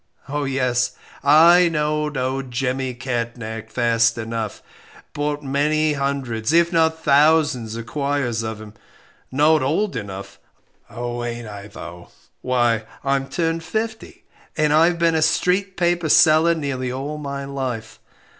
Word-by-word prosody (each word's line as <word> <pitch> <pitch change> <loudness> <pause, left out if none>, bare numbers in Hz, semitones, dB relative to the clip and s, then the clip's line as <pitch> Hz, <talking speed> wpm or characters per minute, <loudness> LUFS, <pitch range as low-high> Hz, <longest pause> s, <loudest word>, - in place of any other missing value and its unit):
Oh, 145 +1 -2
yes, 125 -2 0 0.3
I 170 +5 +6
know'd 150 -1 -1
'Old 130 +1 -2
Jemmy 130 +1 -2
Catnach' 115 -3 -4
fast 115 -1 +2
enough 115 -1 -4 0.5
bought 145 0 -2
many 150 +3 +1
hundreds, 140 -5 -2
if 170 +1 +3
not 160 -1 +2
thousands 145 -6 +3
of 115 0 -6
quires 140 -3 -1
of 110 -1 -5
him. 110 -1 -11 0.6
Not 150 +4 +4
old 155 +6 0
enough? 100 -3 -7 0.5
Oh, 120 0 -5
ain't 120 -1 -5
I 100 -1 -9
though; 85 -4 -10 0.3
why 120 -3 +1 0.2
I'm 135 0 0
turned 165 -1 -1
fifty, 220 +6 -5 0.3
and 155 -1 +2
I've 165 +3 +4
been 170 -1 +2
a 160 - +1
'street 185 +4 +1
paper' 175 -2 +1
seller 160 +2 +5
nearly 135 -5 -3
all 140 +4 -5
my 140 -1 -5
life. 130 -5 -5
140 Hz, 135 wpm, -21 LUFS, 120-155 Hz, 0.6 s, I